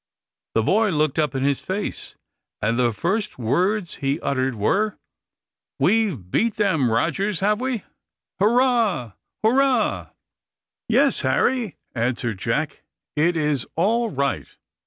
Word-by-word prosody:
The 115 - +3
boy 215 - +3
looked 155 -3 +1
up 150 -4 0
in 135 - -1
his 140 -1 +1
face, 195 +2 -4 0.4
and 115 +3 0
the 120 -1 +3
first 195 - -2
words 180 - 0
he 140 +2 -1
uttered 130 -2 0
were 200 - +1 0.8
"We've 190 - +1
beat 230 -2 +1
them, 165 - +2
Rogers, 170 - 0
have 210 +3 +2
we? 255 -5 -2 0.6
Hurrah! 225 - +2 0.3
hurrah!" 255 0 +2 0.8
"Yes, - - +3
Harry," 235 - +1 0.2
answered 115 -3 -1
Jack, - - -2 0.3
"it 165 +3 +2
is 150 -4 0
all 225 +7 +2
right. 140 -5 -1
170 Hz, 120 wpm, -23 LUFS, 130-215 Hz, 0.8 s, The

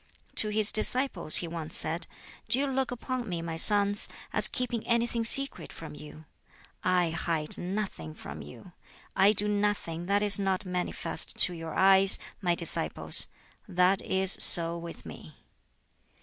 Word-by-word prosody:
To 215 - -3
his 215 0 0
disciples 215 - +1
he 175 - +3
once 165 -2 -7
said, 165 +2 -4 0.4
"Do 250 - +3
you 280 - -1
look 265 -2 -3
upon 250 -1 -7
me, 170 -2 -6
my 165 -1 -7
sons, 205 +3 +3 0.2
as - - +1
keeping 240 -3 -5
anything 235 0 -2
secret 275 +4 -3
from 160 - -12
you? 150 +1 -14 0.6
I 180 -2 -1
hide 165 -2 0
nothing 180 - -7
from - - -11
you. 75 - -14 0.4
I 195 +2 +3
do 210 0 +1
nothing 205 -5 -4
that 200 +1 -1
is 205 -1 +3
not 195 0 -3
manifest 180 -1 -4
to 180 - +4
your 165 -1 -9
eyes, 195 0 +4 0.2
my 175 -3 -1
disciples. 170 -1 +1 0.4
That 185 0 0
is 190 0 +1
so 170 -1 +8
with 170 0 -11
me." - - -13
190 Hz, 150 wpm, -26 LUFS, 170-215 Hz, 0.6 s, so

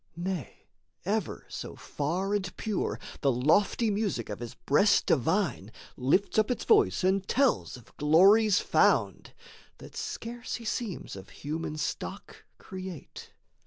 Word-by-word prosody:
Nay, 175 - -5 0.4
ever 205 -2 -2
so - - -7
far 180 +8 -2
and 190 -3 -2
pure 215 -3 -2 0.2
The 140 - +2
lofty 195 - +2
music 200 - -2
of 105 - -5
his 120 -1 -7
breast 200 +9 +3
divine 145 - 0 0.2
Lifts 150 +12 +2
up 215 - +2
its 250 - -1
voice 420 - +4
and 190 +1 +1
tells 265 - +1
of 120 - -18
glories 195 +8 +5
found, - - +1 0.4
That - - -13
scarce 235 +1 -5
he 235 - -8
seems 215 - -4
of 95 0 -11
human 155 +1 -5
stock 150 - -5
create. 185 -4 -9
190 Hz, 130 wpm, -29 LUFS, 150-210 Hz, 0.4 s, glories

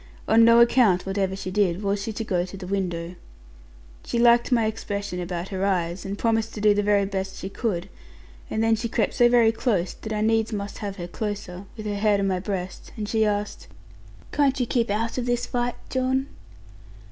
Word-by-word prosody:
On 225 +1 +6
no 230 +1 +7
account, 235 -6 +4
whatever 195 0 -1
she 185 -1 -5
did, 195 -1 +1
was 200 0 0
she 225 - -3
to 220 +1 -4
go 180 -5 0
to 185 +2 -8
the 190 - -8
window. 180 -3 -2 0.9
She - - -3
liked 235 +1 +4
my 230 -3 +3
expression 205 -3 -3
about 175 +1 -4
her 190 -1 -3
eyes, 175 -2 -1
and 195 +1 -4
promised 225 0 0
to - - -5
do 210 0 +5
the 205 - +1
very 205 -1 +3
best 195 -1 -4
she 190 - -5
could 195 -5 -2 0.6
and 220 - 0
then 225 0 +4
she 230 +1 -3
crept 220 -2 0
so 240 -2 +5
very 235 -2 +5
close, 215 -6 0
that 220 - -8
I 210 -1 -1
needs 225 +1 +2
must 200 -1 -5
have 200 -2 -4
her 175 -3 -6
closer; 205 -1 -4
and 185 +3 -9
with 215 - -7
her 210 - -2
head 205 0 +2
on 200 - +1
my 190 -2 0
breast 185 -1 -5
she 220 +1 +1
asked, 205 0 -3 0.6
'Can't 280 -2 +2
you 250 - +2
keep 235 -1 0
out 230 +4 -1
of 245 - -3
this 245 0 0
fight, 245 0 -1 0.2
John?' 260 +1 +1
205 Hz, 210 wpm, -24 LUFS, 190-230 Hz, 0.9 s, no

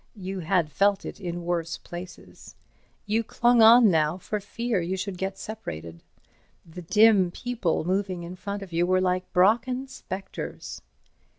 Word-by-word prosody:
You 190 -1 -5
had 170 -2 0
felt 200 +2 +2
it - - -8
in 175 -1 -4
worse 170 -1 -2
places. 175 +1 -11 0.5
You 220 +2 0
clung 240 +1 +3
on 225 -1 +8
now 155 +1 +1
for 210 +3 -4
fear 215 0 -2
you 180 +3 -2
should 190 0 -4
get 190 +1 -4
separated. 85 - -7 0.6
The 165 +2 -10
dim 210 +1 +4
people 220 -4 -2
moving 185 -1 -1
in 175 +2 -7
front 200 +2 -5
of 185 -3 -12
you 170 +1 +1
were 185 0 +3
like 185 0 -1
Brocken 235 +8 +2
spectres. 190 -6 -7
190 Hz, 155 wpm, -26 LUFS, 175-210 Hz, 0.6 s, on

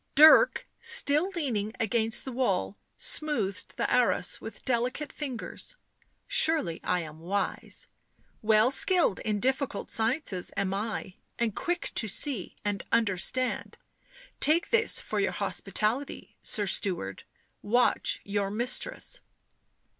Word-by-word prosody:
Dirk, 315 - +7
still 300 +6 +2
leaning 225 -10 -2
against 225 0 +2
the 265 - -5
wall, 170 - -1 0.2
smoothed 230 -11 -1
the - - 0
arras - - +2
with - - -9
delicate 255 +4 -1
fingers. 290 - -6 0.3
" - - -43 0.2
Surely 320 - +2
I 180 -1 0
am 155 -1 -9
wise. 195 +4 -3 0.5
Well 220 +3 +4
skilled 350 - +3
in 210 -2 -2
difficult 260 -2 -1
sciences 225 - -1
am 195 -1 0
I, 200 -2 -4 0.2
and 230 -3 -1
quick 350 0 -2
to 220 - +2
see 225 - -1
— - - -36
and 205 -2 -2
understand 230 +3 0 0.3
— - - -24
take 315 +4 +3
this 445 -2 +3
for - - -3
your - - 0
hospitality, 235 +7 -2
sir 210 - +2
steward 175 - -1 0.2
— - - -45 0.2
watch - - +2
your 200 -1 -2
mistress." 240 - 0
230 Hz, 130 wpm, -28 LUFS, 200-285 Hz, 0.5 s, Dirk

